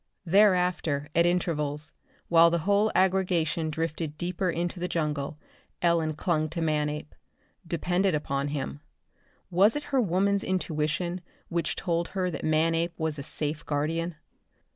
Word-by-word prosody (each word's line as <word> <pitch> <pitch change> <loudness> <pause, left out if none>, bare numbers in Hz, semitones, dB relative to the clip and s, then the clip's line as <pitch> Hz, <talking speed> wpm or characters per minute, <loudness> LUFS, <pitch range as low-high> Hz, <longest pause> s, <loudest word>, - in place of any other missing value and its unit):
Thereafter 180 -6 +3
at 170 +1 +4
intervals, 150 -4 -1 0.4
while 170 0 +6
the 170 - +1
whole 205 +2 +3
aggregation 180 -4 +2
drifted 160 -1 -3
deeper 180 +2 -1
into 175 +1 -2
the 180 - -1
jungle, 150 -4 -2 0.4
Ellen 165 -3 +1
clung 155 -1 0
to 170 - -4
Manape; 150 -1 -1 0.5
depended 175 +2 +1
upon 140 -1 -1
him. 145 0 -4 0.7
Was 195 +5 +5
it 295 - -2
her 265 - +4
woman's 200 0 +1
intuition 175 0 -1 0.3
which 170 -2 -1
told 170 -2 -1
her 185 -2 -2
that - - -6
Manape 165 +2 +1
was 160 -2 -2
a - - -3
safe 150 +1 0
guardian? 160 +3 -1
165 Hz, 135 wpm, -27 LUFS, 155-180 Hz, 0.7 s, while